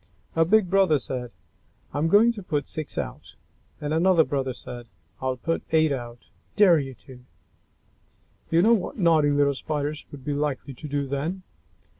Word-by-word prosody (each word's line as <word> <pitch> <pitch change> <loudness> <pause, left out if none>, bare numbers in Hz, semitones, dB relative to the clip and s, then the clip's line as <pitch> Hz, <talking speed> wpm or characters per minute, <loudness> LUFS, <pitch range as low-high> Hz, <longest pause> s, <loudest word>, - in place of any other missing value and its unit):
A 165 0 +4
big 210 +2 +4
brother 190 -4 +4
said, 125 -2 -5 0.6
"I'm 145 +3 +1
going 210 +7 +5
to 220 -3 -8
put 150 -6 -2
six 155 -2 -6
out!" - - -6 0.4
And 150 0 -4
then 160 - +2
another 175 -1 +5
brother 135 -3 -2
said 120 -1 -9 0.3
"I'll 130 -1 -1
put 165 +6 -2
eight 160 -1 +3
out! 120 -3 -5 0.3
Dare 190 -6 +6
you 135 -2 -5
to!" 130 -2 -12 1.3
You 165 +2 +3
know 230 +3 +6
what 200 -6 -1
naughty 165 -6 +4
little 145 0 +3
Spiders 150 +1 -4
would 140 -2 -11
be 145 - -1
likely 140 -2 -2
to 150 - -9
do 145 -1 -1
then. 150 +8 -3
150 Hz, 170 wpm, -25 LUFS, 135-170 Hz, 1.3 s, Dare